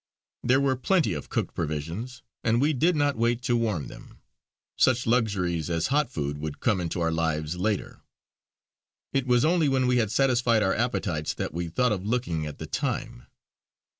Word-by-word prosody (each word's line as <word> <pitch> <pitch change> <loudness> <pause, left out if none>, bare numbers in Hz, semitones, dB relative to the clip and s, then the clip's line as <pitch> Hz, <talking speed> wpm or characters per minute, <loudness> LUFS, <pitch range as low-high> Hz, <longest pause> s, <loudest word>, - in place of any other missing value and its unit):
There 130 +2 +3
were 135 -1 +2
plenty 140 - +1
of 75 - -6
cooked - - -2
provisions, 85 - -4 0.2
and 115 +1 +2
we 150 +4 +3
did 165 +6 +2
not 145 -3 +1
wait 120 +1 +1
to 120 - +1
warm 105 - 0
them: - - -12 0.6
such 125 -1 +3
luxuries 95 -9 0
as 85 0 0
hot 150 -3 +2
food 75 - -3
would 75 -1 -5
come 105 -7 +1
into 85 0 -3
our 80 0 +1
lives 80 -1 -1
later. 100 +2 -2 1.1
It 135 -1 0
was 125 +1 +4
only 165 -2 +3
when 130 -1 +2
we 125 0 +3
had 110 -4 +1
satisfied 120 -2 +3
our 95 - +2
appetites 90 -9 -1
that - - -4
we 85 +1 -3
thought 125 +8 +1
of 95 -3 -1
looking 100 -9 -1
at 75 - -8
the - - -6
time. - - -3
110 Hz, 180 wpm, -26 LUFS, 85-125 Hz, 1.1 s, was